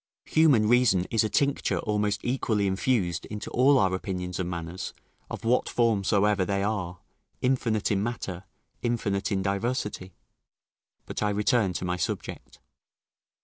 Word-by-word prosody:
Human 140 Hz, -10 st, +4 dB
reason 115 Hz, -6 st, +4 dB
is 110 Hz, -2 st, +3 dB
a 110 Hz, -, 0 dB
tincture 140 Hz, +3 st, +1 dB
almost 105 Hz, -1 st, -1 dB
equally 115 Hz, -5 st, 0 dB
infused 95 Hz, -3 st, 0 dB
into 105 Hz, 0 st, -6 dB
all 135 Hz, +3 st, +5 dB
our 95 Hz, -4 st, +2 dB
opinions 90 Hz, -2 st, -4 dB
and 90 Hz, -1 st, -2 dB
manners, 85 Hz, +1 st, -5 dB, 0.3 s
of -, -, -6 dB
what 120 Hz, +2 st, +2 dB
form 115 Hz, -4 st, +2 dB
soever 100 Hz, 0 st, +2 dB
they 100 Hz, +1 st, -1 dB
are; 95 Hz, -4 st, -2 dB, 0.4 s
infinite 120 Hz, -5 st, +1 dB
in 100 Hz, -1 st, +1 dB
matter, 100 Hz, -5 st, -4 dB, 0.4 s
infinite 110 Hz, -4 st, -1 dB
in 95 Hz, -1 st, 0 dB
diversity. 100 Hz, -2 st, -2 dB, 0.9 s
But -, -, -5 dB
I 105 Hz, -, +2 dB
return 105 Hz, -1 st, +2 dB
to 90 Hz, -, -3 dB
my 90 Hz, 0 st, -1 dB
subject. -, -, -5 dB
105 Hz, 145 wpm, -27 LUFS, 95-115 Hz, 0.9 s, all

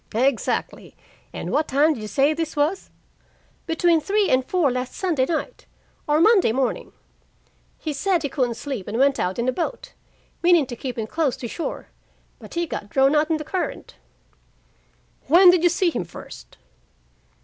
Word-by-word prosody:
"Exactly. 255 Hz, +1 st, -1 dB, 0.4 s
And -, -, -6 dB
what 305 Hz, -, +1 dB
time 295 Hz, +4 st, +3 dB
did 230 Hz, -, -8 dB
you 215 Hz, -, -5 dB
say 280 Hz, +7 st, +2 dB
this 325 Hz, 0 st, -4 dB
was?" 305 Hz, +6 st, -1 dB, 0.8 s
"Between 330 Hz, 0 st, +2 dB
three 405 Hz, +4 st, +1 dB
and 255 Hz, 0 st, +3 dB
four 320 Hz, -1 st, +1 dB
last 250 Hz, 0 st, -4 dB
Sunday 320 Hz, -9 st, 0 dB
night 340 Hz, +9 st, -4 dB, 0.4 s
or 300 Hz, +1 st, +2 dB
Monday 390 Hz, -, +5 dB
morning. 255 Hz, +1 st, -2 dB, 0.9 s
He 310 Hz, -, -4 dB
said 355 Hz, +3 st, 0 dB
he 285 Hz, -, -1 dB
couldn't 250 Hz, -5 st, -1 dB
sleep 240 Hz, -4 st, -6 dB
and 220 Hz, -, -3 dB
went 275 Hz, +1 st, +3 dB
out 180 Hz, +1 st, -1 dB
in 235 Hz, +1 st, -1 dB
a -, -, +3 dB
boat, 345 Hz, -, -5 dB, 0.5 s
meaning 345 Hz, -4 st, +4 dB
to 245 Hz, -, -7 dB
keep 250 Hz, +1 st, -6 dB
in 225 Hz, -, -2 dB
close 295 Hz, +2 st, -1 dB
to 240 Hz, -, -6 dB
shore. 330 Hz, -, -6 dB, 0.5 s
But -, -, -12 dB
he 340 Hz, 0 st, 0 dB
got 205 Hz, -9 st, -6 dB
drawn 270 Hz, +3 st, +3 dB
out 300 Hz, +1 st, +2 dB
in 320 Hz, -, +1 dB
the 305 Hz, -, -6 dB
current." 360 Hz, +3 st, -4 dB, 1.3 s
"Where 355 Hz, +5 st, +8 dB
did 355 Hz, -2 st, +2 dB
you 350 Hz, -, +4 dB
see 350 Hz, +1 st, +1 dB
him 235 Hz, -, -3 dB
first?" 170 Hz, -, -12 dB
300 Hz, 175 wpm, -23 LUFS, 255-340 Hz, 1.3 s, Where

